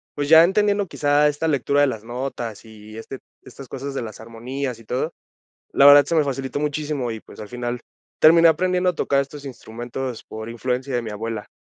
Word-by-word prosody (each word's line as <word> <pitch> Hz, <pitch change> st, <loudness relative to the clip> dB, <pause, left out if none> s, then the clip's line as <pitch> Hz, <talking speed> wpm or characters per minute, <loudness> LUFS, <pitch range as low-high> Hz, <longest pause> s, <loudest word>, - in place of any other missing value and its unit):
pues, 145 Hz, -1 st, -2 dB
ya 160 Hz, +2 st, +8 dB
entendiendo 205 Hz, +2 st, +2 dB
quizá 150 Hz, -2 st, +2 dB
esta 150 Hz, +2 st, -2 dB
lectura 140 Hz, -1 st, +1 dB
de 145 Hz, -, +5 dB
las 110 Hz, -4 st, -4 dB
notas, 120 Hz, -2 st, -5 dB
y 110 Hz, 0 st, -13 dB
este 130 Hz, +3 st, -8 dB, 0.2 s
estas 135 Hz, -2 st, -12 dB
cosas 135 Hz, +1 st, -6 dB
de -, -, -3 dB
las 110 Hz, -2 st, -8 dB
armonías 120 Hz, +2 st, -5 dB
y -, -, -15 dB
todo, 130 Hz, +8 st, -3 dB, 0.6 s
la 140 Hz, -, +4 dB
verdad, 145 Hz, 0 st, +9 dB
se -, -, -1 dB
me 155 Hz, -, +4 dB
facilitó 135 Hz, 0 st, -3 dB
muchísimo. 145 Hz, -4 st, -2 dB
Y, 110 Hz, -, -5 dB
pues, -, -, -14 dB
al 105 Hz, -, -8 dB
final, 120 Hz, 0 st, -4 dB, 0.4 s
terminé 165 Hz, +1 st, +7 dB
aprendiendo 180 Hz, +3 st, +2 dB
a 180 Hz, -, -8 dB
tocar 140 Hz, -1 st, +1 dB
estos 140 Hz, +1 st, -7 dB
instrumentos 120 Hz, 0 st, -6 dB
por 110 Hz, +1 st, -8 dB
influencia 125 Hz, +3 st, -3 dB
de 120 Hz, -, 0 dB
mi 110 Hz, -, -6 dB
abuela. 110 Hz, 0 st, -5 dB
135 Hz, 200 wpm, -22 LUFS, 115-145 Hz, 0.6 s, verdad